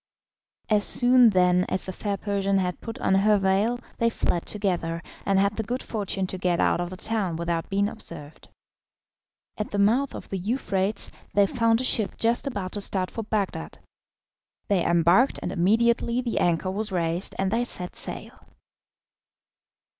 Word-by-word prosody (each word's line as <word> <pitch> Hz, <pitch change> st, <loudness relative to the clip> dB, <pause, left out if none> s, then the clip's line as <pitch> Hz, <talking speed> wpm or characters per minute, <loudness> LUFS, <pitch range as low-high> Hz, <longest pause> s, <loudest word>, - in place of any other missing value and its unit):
As 210 Hz, -2 st, +2 dB
soon, 245 Hz, 0 st, +6 dB
then, 180 Hz, -2 st, +3 dB
as 185 Hz, -, -2 dB
the 190 Hz, -, -5 dB
fair 200 Hz, +1 st, -3 dB
Persian 200 Hz, -1 st, 0 dB
had 180 Hz, -2 st, -2 dB
put 225 Hz, -1 st, -7 dB
on -, -, 0 dB
her 205 Hz, +2 st, +4 dB
veil 200 Hz, +5 st, +1 dB, 0.2 s
they 230 Hz, -, +3 dB
fled 175 Hz, -6 st, -2 dB
together, 175 Hz, -5 st, -2 dB, 0.2 s
and 195 Hz, -1 st, +3 dB
had 200 Hz, +1 st, +2 dB
the -, -, 0 dB
good 245 Hz, +5 st, -4 dB
fortune 200 Hz, -3 st, -3 dB
to 185 Hz, 0 st, -5 dB
get 180 Hz, -2 st, 0 dB
out -, -, +2 dB
of 175 Hz, -, -3 dB
the 185 Hz, -, -8 dB
town 205 Hz, -5 st, -1 dB
without 170 Hz, 0 st, -2 dB
being 200 Hz, +1 st, +1 dB
observed. 155 Hz, -8 st, -6 dB, 1.1 s
At 210 Hz, -, -3 dB
the 205 Hz, -, -3 dB
mouth 235 Hz, +8 st, +2 dB
of -, -, -8 dB
the 195 Hz, -, -3 dB
Euphrates 200 Hz, -1 st, -1 dB, 0.2 s
they 200 Hz, 0 st, +5 dB
found 230 Hz, +2 st, +1 dB
a -, -, -2 dB
ship 225 Hz, -5 st, +1 dB
just 235 Hz, +4 st, 0 dB
about 200 Hz, -8 st, -4 dB
to 205 Hz, -, -4 dB
start 190 Hz, -2 st, -1 dB
for 225 Hz, -, -4 dB
Bagdad. 210 Hz, -2 st, -3 dB, 0.9 s
They 190 Hz, -4 st, +2 dB
embarked, 170 Hz, -, +3 dB
and -, -, -3 dB
immediately 235 Hz, +6 st, +2 dB
the 245 Hz, -2 st, -1 dB
anchor 175 Hz, +2 st, +1 dB
was 210 Hz, +2 st, -3 dB
raised 170 Hz, 0 st, -1 dB
and 195 Hz, 0 st, 0 dB
they 230 Hz, +2 st, +1 dB
set 180 Hz, -7 st, -3 dB
sail. -, -, -7 dB
200 Hz, 170 wpm, -25 LUFS, 185-225 Hz, 1.1 s, soon